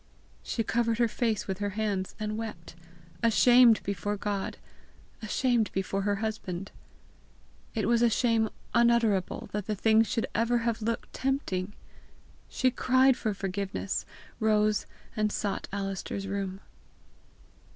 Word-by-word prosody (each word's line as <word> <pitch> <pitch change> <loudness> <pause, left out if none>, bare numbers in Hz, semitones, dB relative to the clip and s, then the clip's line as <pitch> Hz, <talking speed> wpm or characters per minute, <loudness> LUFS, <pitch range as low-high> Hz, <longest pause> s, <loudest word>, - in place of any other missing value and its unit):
She 225 - -2
covered 230 +1 +1
her 235 -1 +3
face 225 -2 -1
with 190 -1 -3
her 205 0 -3
hands 200 -3 -1
and 215 0 -2
wept 215 -8 -6 0.5
ashamed 235 0 +6
before 200 +1 -2
God, 200 -1 -3 0.6
ashamed 230 0 +1
before 195 +1 -1
her 205 +1 +1
husband. 195 -4 -4 1.0
It 215 -3 0
was 235 0 +3
a 240 - +5
shame 225 -1 +2 0.2
unutterable 235 -5 +2
that 210 -1 -3
the 215 - -1
thing 220 +2 +4
should 225 +1 0
even 235 +2 +2
have 235 -1 -1
looked 230 +1 -3
tempting! 210 -8 -2 0.8
She 255 -1 +1
cried 260 +1 +4
for 215 -4 -2
forgiveness, 185 - -3 0.4
rose, 215 -1 +2 0.3
and 215 -1 +1
sought 200 -2 -2
Alister's 195 0 -4
room. 195 -1 -4
215 Hz, 130 wpm, -29 LUFS, 195-230 Hz, 1.0 s, ashamed